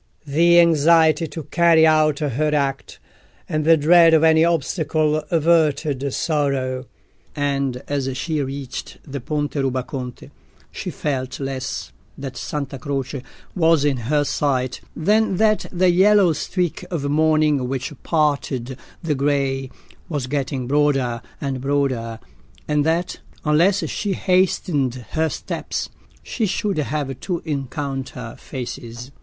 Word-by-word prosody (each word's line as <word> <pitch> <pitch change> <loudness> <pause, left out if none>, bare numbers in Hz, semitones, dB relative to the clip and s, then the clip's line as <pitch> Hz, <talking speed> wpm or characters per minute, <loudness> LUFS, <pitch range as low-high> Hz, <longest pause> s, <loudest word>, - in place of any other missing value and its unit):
The 170 +4 +4
anxiety 165 -1 +4
to 160 +1 -7
carry 165 +1 +4
out 155 -2 +4
her 150 +1 0
act, 135 -2 -2 0.5
and 155 0 -1
the 165 +1 +5
dread 165 +2 +6
of 160 - +3
any 160 0 +5
obstacle, 155 -1 +1
averted 155 -4 +2
sorrow; 135 -4 -1 0.5
and 140 -3 -1
as 140 -2 -1
she 155 +2 -1
reached 135 -1 -6
the 140 -1 -6
Ponte 145 +3 -2
Rubaconte, 130 -2 -3 0.4
she - - -5
felt 130 -2 -3
less 135 -1 -4 0.3
that 135 -2 -6
Santa 140 -2 -4
Croce 140 -2 -3 0.3
was 165 -4 +3
in 140 -3 +1
her 145 +5 +1
sight 130 -3 -1
than 210 +3 +2
that 215 0 +2
the 180 0 +3
yellow 190 -1 +5
streak 175 +3 -2
of 165 -6 -3
morning 155 -2 +2
which 135 +2 -3
parted 140 -5 -1 0.2
the 160 -2 0
grey 135 -1 0 0.4
was 145 -6 -2
getting 135 -1 -2
broader 135 -4 +1 0.2
and 135 -3 -3
broader, 130 -5 -1 0.5
and 150 -1 +2
that, 170 +2 -1 0.3
unless 170 +7 +3
she 205 -2 -2
hastened 155 -10 +1
her 160 0 +1
steps, - - -4 0.3
she 225 -4 -2
should 195 0 -1
have 135 -1 -3
to 175 -3 -3
encounter 135 -4 -4
faces. 125 -1 -7
145 Hz, 125 wpm, -21 LUFS, 135-160 Hz, 0.5 s, dread